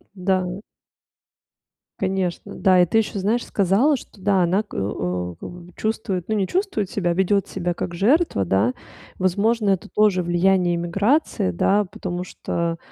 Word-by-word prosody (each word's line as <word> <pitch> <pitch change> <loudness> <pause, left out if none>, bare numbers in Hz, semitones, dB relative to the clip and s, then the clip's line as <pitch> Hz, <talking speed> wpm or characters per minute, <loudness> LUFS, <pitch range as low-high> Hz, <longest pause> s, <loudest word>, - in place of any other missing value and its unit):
Да. 185 -1 0 1.5
Конечно. 190 -2 -2
Да 185 -2 +4
и - - +5
ты 180 - 0
еще, 210 -2 -2
знаешь, 220 +5 0
сказала, 205 - +2
что 220 - -14
да, 190 0 +2
она 185 +5 +1
к 215 - -20
э - - -5
о 90 -3 -3
как - - -7
бы 175 - -10
бы 175 +1 -15
чувствует, 215 -5 -2
ну, 220 - 0
не 195 -3 0
чувствует 355 - -1
себя, 175 -4 0
ведет 190 +2 +1
себя 175 -2 -2
как 175 - -5
жертва. 225 - +2
Да? 100 +7 +2 0.5
Возможно, 205 +4 +1
это 190 -4 0
тоже 195 -2 +2
влияние 175 +1 +2
эмиграции, 195 - +1
да, 200 - +2
потому 175 -1 -5
что, 170 -2 -3
190 Hz, 165 wpm, -22 LUFS, 175-210 Hz, 1.5 s, и